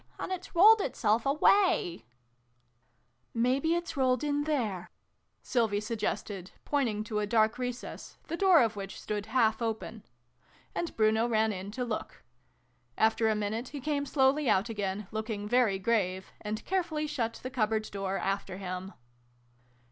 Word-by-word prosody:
And - - -5
it's 370 -1 -6
rolled 425 +5 +8
itself 230 - +1
away! 290 - +3 0.4
" 120 0 -42
" 120 - -5
Maybe 275 +6 +2
it's 345 -1 -3
rolled 260 0 +2
in 290 0 0
there" 225 - -1 0.5
Sylvie 225 -5 +1
sug 215 +1 -4
gested, 195 -3 -3 0.2
pointing 235 -8 0
to 215 -1 -2
a 210 - -1
dark 220 +1 +2
recess, 245 -1 -6
the 325 - -4
door 365 -5 +6
of 225 -2 -1
which 195 -1 -6
stood 210 0 -4
half 220 -1 +2
open: 220 -1 -3 0.7
and 340 - -3
Bruno 220 +1 +3
ran 220 -1 +2
in 190 +1 -6
to 250 +1 -2
look. 225 -3 -5 0.7
After 220 0 +3
a 215 - +2
minute 215 +4 -2
he 285 - -7
came 285 +1 -1
slowly 270 0 +3
out 195 +5 +2
again, 205 -2 -3
looking 215 -1 -3
very 235 -4 +3
grave, 190 -3 0
and 215 +1 -4
carefully 340 -5 -1
shut 250 -7 -2
the 255 - -5
cupboard 220 -3 0
door 195 -1 -2
after 195 -1 -2
him. 185 0 -5
225 Hz, 155 wpm, -30 LUFS, 205-270 Hz, 0.7 s, rolled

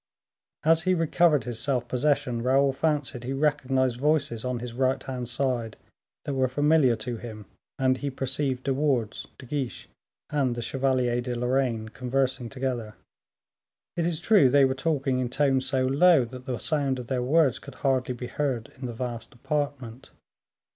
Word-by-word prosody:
As 165 +1 +4
he 185 +2 +2
recovered 165 -4 +3
his 115 -1 -5
self 125 -1 -1
possession, 125 -2 0
Raoul 135 +2 +3
fancied 145 -4 -1
he 130 +2 -3
recognized 135 -3 +1
voices 145 -6 +1
on 125 -1 -2
his 120 0 -6
right 130 +1 0
hand 125 -2 -5
side 120 -3 -1 0.5
that 145 - -2
were 130 -1 +2
familiar 145 -1 +3
to 120 0 -5
him, 110 -3 -9 0.3
and 130 -1 +2
he 145 - -2
perceived 135 0 -2
De 135 - 0
Wardes, 130 -6 -1
De 130 - -11
Guiche, 135 -1 -4 0.4
and 135 -5 +1
the 120 - -4
Chevalier 130 -2 0
de 125 0 -3
Lorraine 125 -2 0
conversing 125 0 -1
together. 125 -5 -3 1.0
It 170 -1 0
is 165 -3 -2
true 185 - +5
they 140 +1 +5
were 130 - +1
talking 135 -2 0
in 125 -1 -1
tones 135 0 +1
so 130 -1 +1
low, 140 +1 +5
that 125 +1 -11
the 125 -2 -2
sound 140 -1 0
of 125 - -6
their 125 0 -1
words 140 0 +3
could 140 - -12
hardly 130 -2 0
be 125 - -6
heard 125 -3 -3
in 130 - -4
the 120 - -5
vast 120 0 -6
apartment. 135 -3 -3
130 Hz, 170 wpm, -26 LUFS, 125-140 Hz, 1.0 s, true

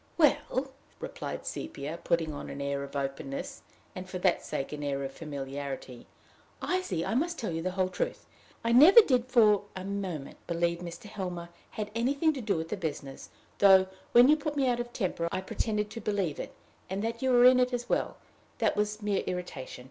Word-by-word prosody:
"Well," 275 -4 +2 0.3
replied - - -6
Sepia, 165 - -5
putting 165 -2 +1
on 145 - -7
an 140 - -6
air 140 0 -2
of 140 +1 -9
openness, 135 0 -4 0.3
and 185 0 -7
for 185 - -4
that 180 -1 +2
sake 135 -3 -4
an 150 - -5
air 140 -1 -1
of 135 - -4
familiarity, 135 -4 -6 0.5
"I 370 +1 0
see 170 - -2
I - - -1
must 335 +7 0
tell 215 - -3
you 165 0 -2
the 185 - -1
whole 185 -1 +2
truth. 185 - -3 0.4
I 230 - +1
never 315 - +10
did 255 - +1
for 215 -5 +4
a 185 - -5
moment 190 -8 -4
believe 170 0 0
Mr. 175 +6 -8
Helmer 180 -5 -5 0.2
had 210 -1 -5
anything 280 +7 +2
to 270 - -5
do 210 -6 0
with 160 0 -4
the 210 - -2
business, 145 -6 -5 0.3
though, 190 -1 +7 0.2
when 240 +1 +8
you 300 - +7
put 300 -1 -4
me 275 -2 +2
out 240 -1 +1
of 240 0 -4
temper, 175 -6 -2
I 185 - -1
pretended 210 +2 -2
to 230 - -6
believe 195 -8 -1
it, - - -6 0.3
and 195 +2 -2
that 230 +1 -3
you 260 - +1
were 245 -1 +6
in 255 0 +8
it 250 0 +2
as 245 -1 -3
well: - - 0 0.4
that - - +1
was 210 +1 -1
mere 205 -2 +1
irritation. 180 -9 -5
195 Hz, 200 wpm, -29 LUFS, 165-240 Hz, 0.5 s, never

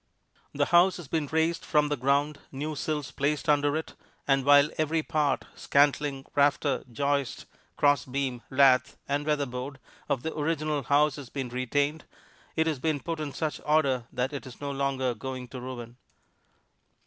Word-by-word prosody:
The - - +1
house 180 +2 +6
has 175 -5 -9
been 155 0 -1
raised 160 +3 0
from 150 -1 +2
the 145 - +1
ground, 140 +3 +1
new 150 +3 -4
sills 150 -2 -3
placed 145 +4 -1
under 145 0 +3
it, 160 - -5 0.3
and 135 -1 +3
while 145 +2 +6
every 155 +1 +1
part 150 -2 0
scantling, 140 -1 +1
rafter, 140 -1 +2
joist, 140 +1 -1 0.3
crossbeam, 135 -3 +1
lath 130 -1 +4
and 145 +1 -1
weatherboard 140 -2 -2 0.3
of 130 -2 0
the 160 - -3
original 155 -1 -1
house 145 +3 +2
has 140 -4 -9
been 135 -3 -4
retained, 140 +5 -1 0.5
it 160 - +2
has 155 -4 -1
been 155 0 0
put 165 +2 -4
in 150 -2 -3
such 155 +1 -3
order 135 -6 +2
that 130 +3 -2
it 140 - -6
is 125 - -11
no 145 -1 -3
longer 135 -2 0
going 130 +2 -6
to 130 0 -7
ruin. 120 -2 -7
145 Hz, 160 wpm, -28 LUFS, 130-150 Hz, 0.5 s, house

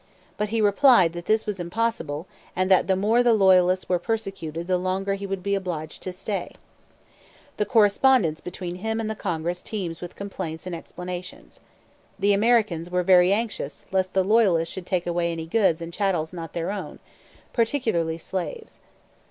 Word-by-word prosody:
But 210 0 -2
he 225 +1 0
replied 205 - +5
that 175 0 -7
this 220 0 +2
was 205 -3 -3
impossible 175 -5 -2 0.3
and 185 +1 0
that 190 - +5
the 190 - +3
more 215 +5 +3
the 240 -1 +4
Loyalists 185 -2 +4
were 180 -1 +1
persecuted 195 -6 -4
the 180 0 +1
longer 190 +2 -1
he 200 0 -4
would 195 -1 -4
be 200 +1 0
obliged 175 -6 -4
to 185 - -4
stay. 190 0 -5 1.0
The 210 - 0
correspondence 210 - +4
between 180 0 -6
him 220 +3 -2
and 220 -1 -2
the - - -4
Congress 175 -3 -3
teems 180 -7 -5
with 175 - -8
complaints 170 -5 -6
and 180 -2 -4
explanations. 180 +2 -8 0.6
The 205 +1 +3
Americans 205 -6 +2
were 180 0 0
very 180 0 +5
anxious 220 +1 -2
lest 190 0 0
the 190 - +4
Loyalists 190 -6 +3
should 185 -1 -7
take 180 -2 0
away 170 0 0
any 165 -1 -4
goods 170 -3 +2
and 165 +1 -8
chattels 185 -5 -1
not 165 -3 -7
their 170 +2 -2
own, 205 -1 -6 0.6
particularly 225 - 0
slaves. 190 - -6
185 Hz, 170 wpm, -24 LUFS, 175-210 Hz, 1.0 s, replied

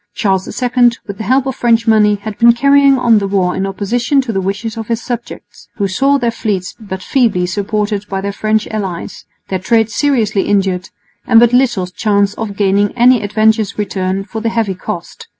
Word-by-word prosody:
Charles 190 -2 0
II, 245 -1 +2
with 200 -2 -8
the 220 - -4
help 260 +4 +2
of 265 -2 -3
French 230 -1 +1
money, 215 -2 +4
had 205 +1 -7
been 235 0 +6
carrying 280 +2 +4
on 235 -3 +3
the 200 - -2
war 190 -2 0
in 195 +1 -2
opposition 235 +8 0
to 245 -4 -5
the 195 - -1
wishes 205 +4 -3
of 225 -2 -6
his 230 -1 -1
subjects, 240 0 -8
who 200 - -1
saw 275 +9 +2
their 240 -3 0
fleets 200 -5 -3
but 190 -4 -7
feebly 230 -10 +1
supported 205 +2 -2
by 195 - -2
their 200 +1 -4
French 215 +1 0
allies, 195 -6 -5 0.2
their 190 - -2
trade 225 +3 +1
seriously 230 -7 +1
injured, 190 -2 0 0.4
and 225 - +6
but 240 0 +4
little 240 -7 +2
chance 200 +2 0
of 215 -2 -5
gaining 205 +2 +1
any 245 -1 +5
advantageous 215 0 +1
return 195 -2 -2
for 220 +2 -7
the 230 - 0
heavy 225 -4 -1
cost. 185 - -7
215 Hz, 195 wpm, -15 LUFS, 195-235 Hz, 0.4 s, been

